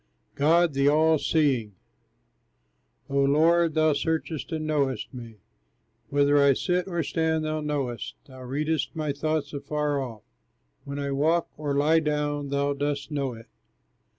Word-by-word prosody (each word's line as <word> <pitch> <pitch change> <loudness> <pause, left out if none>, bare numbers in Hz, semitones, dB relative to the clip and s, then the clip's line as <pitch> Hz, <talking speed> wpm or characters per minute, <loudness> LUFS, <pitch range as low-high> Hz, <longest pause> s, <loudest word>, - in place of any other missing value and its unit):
GOD 165 +3 +3
THE 140 +1 +2
ALL 155 +1 +4
SEEING 130 - +1 1.3
O 140 0 0
Lord, 160 +3 +3
thou 155 -1 +4
searchest 160 +1 -2
and 155 -1 -3
knowest 140 -6 -1
me, 115 -3 -9 0.7
Whether 145 0 +3
I 140 -1 +5
sit 180 +7 -1
or 170 -3 -1
stand, 160 +1 0
thou 155 0 -2
knowest, 140 -5 -3
Thou 130 -1 -13
readest 150 +5 -2
my 155 -3 -2
thought 155 0 -2
afar 145 0 -1
off, 115 -5 -7 0.6
When 140 0 -5
I 140 -1 -2
walk 160 +5 +1
or 145 -2 -3
lie 155 +3 +4
down 150 -2 -1
thou 140 0 0
dost 145 +1 -3
know 140 -4 -2
it. 115 0 -12
145 Hz, 145 wpm, -26 LUFS, 140-155 Hz, 1.3 s, I